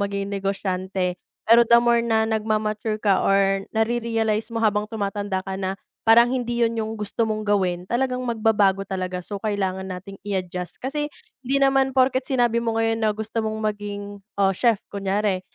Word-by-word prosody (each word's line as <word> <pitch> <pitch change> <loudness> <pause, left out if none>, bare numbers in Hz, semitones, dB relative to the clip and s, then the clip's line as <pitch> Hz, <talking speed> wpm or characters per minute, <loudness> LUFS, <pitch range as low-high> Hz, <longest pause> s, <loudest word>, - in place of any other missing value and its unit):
maging 200 0 -3
negosyante. 190 -2 -2 0.3
Pero 235 +1 +7
the 235 +1 +6
more 235 -1 +3
na 220 -1 +2
nagma-mature 215 0 -1
ka 200 -3 +2
or 195 0 +2
nare-realize 225 -1 0
mo 230 - -2
habang 210 -2 +2
tumatanda 205 -2 -3
ka 190 0 -5
na 190 0 -3 0.2
parang 235 +2 +7
hindi 240 -1 -2
yun 230 0 +2
yung 220 -1 -2
gusto 215 +1 -2
mong 215 -1 -2
gawin, 185 -3 0
talagang 255 +1 0
magbabago 210 -4 +2
talaga, 185 -2 -4
so, 200 +1 -5
kailangan 190 -3 -2
nating 190 +1 -8
i-adjust. 180 -2 -3
Kasi 295 +3 -3 0.3
hindi 265 +1 0
naman 270 -1 +3
porket 260 0 +2
sinabi 240 -3 +2
mo 230 -1 -1
ngayon 225 0 +1
na 215 -1 +1
gusto 220 +1 -2
mong 220 0 -3
maging, 205 -1 -7 0.2
oh, 195 -1 +3
chef 230 +4 +2 0.2
kunyari, 200 -1 0
215 Hz, 165 wpm, -23 LUFS, 195-230 Hz, 0.3 s, Pero